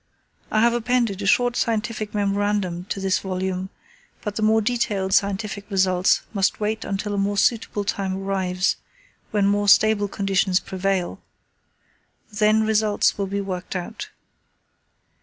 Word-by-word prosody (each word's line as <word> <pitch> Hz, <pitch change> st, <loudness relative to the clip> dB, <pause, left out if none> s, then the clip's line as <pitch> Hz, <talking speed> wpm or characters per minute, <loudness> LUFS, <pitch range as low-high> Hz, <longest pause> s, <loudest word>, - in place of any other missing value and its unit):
I 215 Hz, -, +2 dB
have 235 Hz, +1 st, +4 dB
appended 235 Hz, -4 st, 0 dB
a 200 Hz, -, -2 dB
short 245 Hz, +4 st, +3 dB
scientific 220 Hz, -2 st, -2 dB
memorandum 200 Hz, -3 st, 0 dB
to 200 Hz, -, -4 dB
this 190 Hz, -1 st, +1 dB
volume, 185 Hz, 0 st, -3 dB, 0.5 s
but 210 Hz, -2 st, -4 dB
the 220 Hz, -, -2 dB
more 220 Hz, +1 st, +4 dB
detailed 205 Hz, -4 st, -1 dB
scientific 200 Hz, 0 st, 0 dB
results 185 Hz, -1 st, +2 dB
must 195 Hz, -2 st, +1 dB
wait 215 Hz, +1 st, -2 dB
until 200 Hz, +1 st, -3 dB
a 200 Hz, -, -1 dB
more 200 Hz, +1 st, 0 dB
suitable 215 Hz, -1 st, +1 dB
time 195 Hz, -1 st, -2 dB
arrives, 190 Hz, -1 st, 0 dB, 0.5 s
when 205 Hz, -2 st, +1 dB
more 205 Hz, +1 st, +1 dB
stable 210 Hz, 0 st, +5 dB
conditions 195 Hz, -2 st, +1 dB
prevail. 190 Hz, -1 st, -2 dB, 1.1 s
Then 215 Hz, +1 st, +3 dB
results 215 Hz, -1 st, +2 dB
will 200 Hz, -, 0 dB
be 200 Hz, +1 st, -2 dB
worked 185 Hz, -1 st, -5 dB
out. 185 Hz, +5 st, -5 dB
200 Hz, 140 wpm, -23 LUFS, 190-215 Hz, 1.1 s, stable